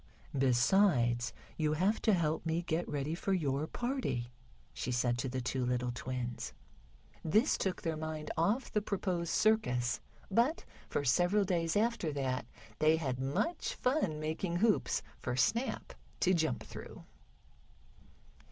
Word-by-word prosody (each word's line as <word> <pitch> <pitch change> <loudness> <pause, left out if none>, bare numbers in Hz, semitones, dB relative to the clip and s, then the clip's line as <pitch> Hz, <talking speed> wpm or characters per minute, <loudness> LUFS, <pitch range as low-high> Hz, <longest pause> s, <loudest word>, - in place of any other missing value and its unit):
"Besides, 125 -1 +3 0.3
you 155 -1 +1
have 190 +8 +1
to 220 - +4
help 160 -3 +1
me 165 +1 0
get 170 0 -1
ready 145 +2 -2
for 195 +3 -1
your 145 -4 0
party," 240 - -2 0.4
she 125 - -3
said 120 0 +2
to 130 - -1
the 130 +1 -2
two 125 +1 -1
little 125 0 0
twins. 125 -1 -4 0.7
This 215 - +3
took 190 -2 -2
their 165 -1 0
mind 155 -1 -4
off 205 +11 +1
the 210 - +1
proposed 185 -5 -1
circus, 125 - +2 0.3
but 240 - +2 0.2
for 145 - -1
several 180 +10 +4
days 170 -3 0
after 220 -7 +1
that 130 -4 -2 0.3
they 155 +1 +5
had 135 -6 -2
much 325 - -1
fun 250 - 0
making 160 +3 -2
hoops 215 +4 +2 0.2
for 125 - -2
Snap 230 - 0 0.3
to 185 - +4
jump 155 -10 0
through. - - -10
160 Hz, 140 wpm, -33 LUFS, 130-195 Hz, 0.7 s, they